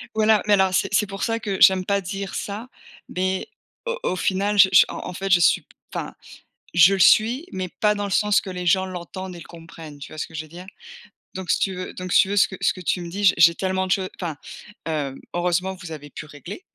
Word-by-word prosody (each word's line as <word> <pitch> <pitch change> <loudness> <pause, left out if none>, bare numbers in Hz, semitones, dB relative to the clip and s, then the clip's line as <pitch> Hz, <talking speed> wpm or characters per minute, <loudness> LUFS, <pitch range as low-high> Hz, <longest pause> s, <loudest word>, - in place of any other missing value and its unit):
Voilà, 215 -1 +4
mais 205 - +4
alors 190 -1 +3
c'est 195 - 0
c'est 210 - +2
pour 195 0 -6
ça 225 -1 0
que 200 -3 -4
j'aime 185 -1 +6
pas 200 -1 +1
dire 195 +1 -5
ça, 210 +5 -5 0.4
mais 185 +1 -2 0.4
au 480 0 -2
au 185 - 0
final, 200 +3 0
je 190 -1 +8 0.2
en - - -6
en - - -7
fait 195 +2 -4
je 180 - +6
suis - - +3 0.3
enfin - - -5 0.6
je 175 +3 +7
le 190 - -3
suis, 240 - +4
mais 185 -1 -4
pas 210 +4 +1
dans 205 0 -3
le 200 - -4
sens 210 +1 +3
que 195 - -8
les 180 -1 -5
gens 190 +2 +3
l'entendent 185 +1 -7
et - - -10
le - - -11
comprennent, 165 -3 -12
tu 140 - -10
vois 155 - -10
ce - - -3
que 160 - -18
je 155 - -3
veux - - -16
dire? 175 +3 -11 0.7
Donc 185 -1 -5
si - - +3
tu 190 -2 0
veux 185 0 -7
donc 185 0 -6
si - - +7
tu - - -3
veux 205 - -2
ce 195 - +5
que 190 - -9
ce - - +2
que 185 - -10
tu 180 - -1
me 170 - -6
dis, 200 +3 -4
j'ai 190 - +6
j'ai 170 0 +7
tellement 190 0 -1
de - - +1
choses 190 -1 0
enfin, 165 -5 -4 0.5
heu, 145 -4 -2 0.2
heureusement 180 +2 0
vous 175 -3 -10
avez 145 -1 -9
pu 155 - -9
régler, 150 - -10
185 Hz, 260 wpm, -23 LUFS, 175-200 Hz, 0.7 s, je